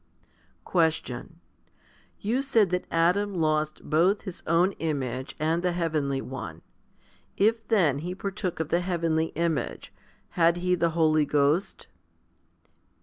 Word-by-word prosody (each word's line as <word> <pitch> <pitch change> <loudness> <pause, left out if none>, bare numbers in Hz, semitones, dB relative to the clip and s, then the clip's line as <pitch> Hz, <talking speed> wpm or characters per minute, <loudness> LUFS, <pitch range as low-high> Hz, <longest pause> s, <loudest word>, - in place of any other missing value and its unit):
6. - - -39 0.3
Question. 160 -2 -1 0.8
You 235 +6 0
said 225 -9 +2
that 180 0 -1
Adam 185 +5 +1
lost 155 -2 -1
both 175 +7 +2
his 190 -4 -7
own 170 +4 +3
image 130 -5 -3
and 160 +3 0
the 180 -1 0
heavenly 155 -6 -1
one. 125 -5 -7 0.7
If 225 +2 +2
then 170 - +3
he 175 +4 -5
partook 195 -2 -4
of 160 -2 -2
the 175 - +2
heavenly 165 -3 0
image, 165 -2 -2 0.4
had 170 0 +3
he 180 +1 0
the 170 -1 +2
Holy 155 -2 +4
Ghost? 150 +6 +1
170 Hz, 130 wpm, -27 LUFS, 155-180 Hz, 0.8 s, Holy